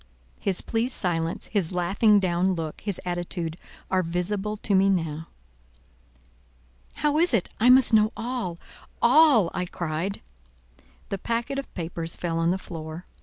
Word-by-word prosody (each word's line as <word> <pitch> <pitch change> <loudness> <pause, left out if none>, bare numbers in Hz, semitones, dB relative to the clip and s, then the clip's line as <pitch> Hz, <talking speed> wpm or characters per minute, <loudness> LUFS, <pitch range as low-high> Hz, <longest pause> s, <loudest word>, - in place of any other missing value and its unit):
His 190 -2 +2
pleased 235 +3 -1
silence, 165 -2 -2
his 195 -6 -1
laughing 200 +4 +3
down 185 0 +1
look, 160 -3 -5
his 200 -3 -3
attitude, 175 -2 -3 0.4
are 185 -1 +3
visible 190 +5 -1
to 205 - -2
me 195 +1 +4
now. 160 -4 -1 1.7
"How 300 0 +1
is 335 -6 +4
it? 195 - 0
I 240 - +5
must 255 -2 +6
know 215 0 +5
all—all," 235 - +2
I 180 - -2
cried. 175 +2 -4 0.9
The 195 - -3
packet 235 +6 -2
of 275 - -8
papers 165 -1 -2
fell 165 -2 -2
on 165 0 +2
the 185 - +1
floor. 165 -1 -8
185 Hz, 140 wpm, -25 LUFS, 170-220 Hz, 1.7 s, must